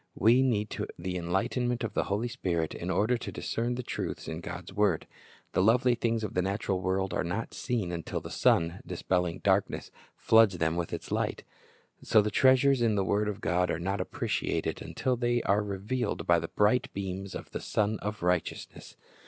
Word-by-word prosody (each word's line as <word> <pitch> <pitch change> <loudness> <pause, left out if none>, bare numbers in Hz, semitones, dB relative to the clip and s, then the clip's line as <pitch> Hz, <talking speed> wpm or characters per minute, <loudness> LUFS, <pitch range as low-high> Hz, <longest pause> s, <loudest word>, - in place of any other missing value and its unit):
We 115 +5 +5
need 110 -5 0 0.2
the 90 +2 -4
enlightenment 115 +8 -1
of 110 -3 -3
the - - 0
Holy 105 +5 -1
Spirit 90 -10 -2
in 85 - -5
order 110 +6 +2
to - - -6
discern 120 +2 -2
the 125 - -4
truths - - -4
in 80 +1 -5
God's - - -7
word. 100 -6 +2 0.5
The - - +3
lovely 120 +5 +4
things 115 -1 0
of 105 - -3
the 90 - +1
natural 95 0 -1
world 95 0 0
are - - 0
not 90 +7 -3
seen 115 -9 -2
until 85 -2 -3
the - - -9
sun, 85 +3 +2
dispelling 90 -1 -1
the - - -13
darkness, 100 0 +1 0.3
floods 110 -5 +5
them 80 0 +1
with 85 -1 -2
its - - -6
light. - - -1 0.6
So 110 - +4
the 105 0 +1
treasures 130 +2 +4
in 115 -3 +3
the 100 -1 +1
word 105 +2 +1
of 105 +1 -5
God 90 0 +1
are 80 - -1
not 95 +2 -1
appreciated - - -2
until 130 -1 -1
they 120 0 0
are 100 +2 +3
revealed 105 +5 -2
by 85 -1 +4
the 80 - -4
bright 105 +8 +2
beams 95 0 -4
of - - -8
the - - -4
Sun 105 0 0
of 105 -2 -5
Righteousness. 90 -2 -2
100 Hz, 195 wpm, -29 LUFS, 90-115 Hz, 0.6 s, We